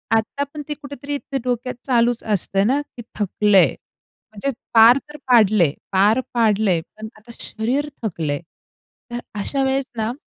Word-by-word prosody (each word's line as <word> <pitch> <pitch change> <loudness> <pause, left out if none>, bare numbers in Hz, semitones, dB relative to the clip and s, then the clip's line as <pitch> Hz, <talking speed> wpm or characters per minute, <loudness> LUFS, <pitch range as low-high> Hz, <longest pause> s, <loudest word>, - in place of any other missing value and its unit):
आत्ता 225 +6 -1
पण 300 - -6
ते - - 0
कुठेतरी 285 0 -6
ते 275 -1 -5
डोक्यात 250 0 -2
चालूच 240 -1 +2
असतंय 195 -2 0
ना, 265 +7 +2
की 270 -4 -12 0.2
थकलंय. 205 -1 +3 0.6
म्हणजे 215 +6 -3 0.2
पार 230 +3 +8
तर 300 - -10
पाडलंय, 215 - +5 0.2
पार 205 +5 +4
पाडलंय, 215 -6 +2 0.2
पण 220 - -7
आता 215 +2 -15
शरीर 255 +7 -2 0.2
थकलंय, 160 -8 -2 0.7
तर 240 - -3 0.2
अशा 270 +7 -1
वेळेस 270 0 0
ना, 220 +1 -1
230 Hz, 145 wpm, -21 LUFS, 210-270 Hz, 0.7 s, पार